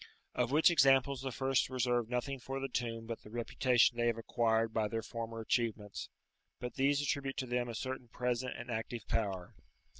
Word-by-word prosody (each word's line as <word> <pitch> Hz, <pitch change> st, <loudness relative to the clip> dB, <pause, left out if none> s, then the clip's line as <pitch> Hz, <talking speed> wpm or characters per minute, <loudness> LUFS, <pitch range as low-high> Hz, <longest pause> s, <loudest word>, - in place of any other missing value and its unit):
Of 125 Hz, -1 st, +1 dB
which 155 Hz, +5 st, +5 dB
examples 135 Hz, -4 st, +4 dB
the 135 Hz, -1 st, -3 dB
first 135 Hz, +1 st, +1 dB
reserve 120 Hz, -3 st, +1 dB
nothing 130 Hz, +2 st, -2 dB
for 135 Hz, +2 st, -4 dB
the 135 Hz, -, -2 dB
tomb 115 Hz, -2 st, -3 dB
but 115 Hz, 0 st, -5 dB
the -, -, -13 dB
reputation 120 Hz, +1 st, +2 dB
they 120 Hz, -, +3 dB
have 115 Hz, -1 st, +1 dB
acquired 115 Hz, -1 st, +1 dB
by 110 Hz, -2 st, +1 dB
their 115 Hz, +1 st, -3 dB
former 115 Hz, -1 st, -5 dB
achievements, 110 Hz, -3 st, -1 dB, 0.5 s
but 125 Hz, -1 st, -5 dB
these 140 Hz, +1 st, +2 dB
attribute 140 Hz, -2 st, -1 dB
to 130 Hz, -, -1 dB
them 120 Hz, 0 st, -1 dB
a 115 Hz, -, -5 dB
certain 130 Hz, +1 st, -4 dB
present 125 Hz, +1 st, -2 dB
and 125 Hz, +1 st, -6 dB
active 115 Hz, 0 st, -4 dB
power. 95 Hz, -5 st, -1 dB
120 Hz, 185 wpm, -34 LUFS, 115-130 Hz, 0.5 s, which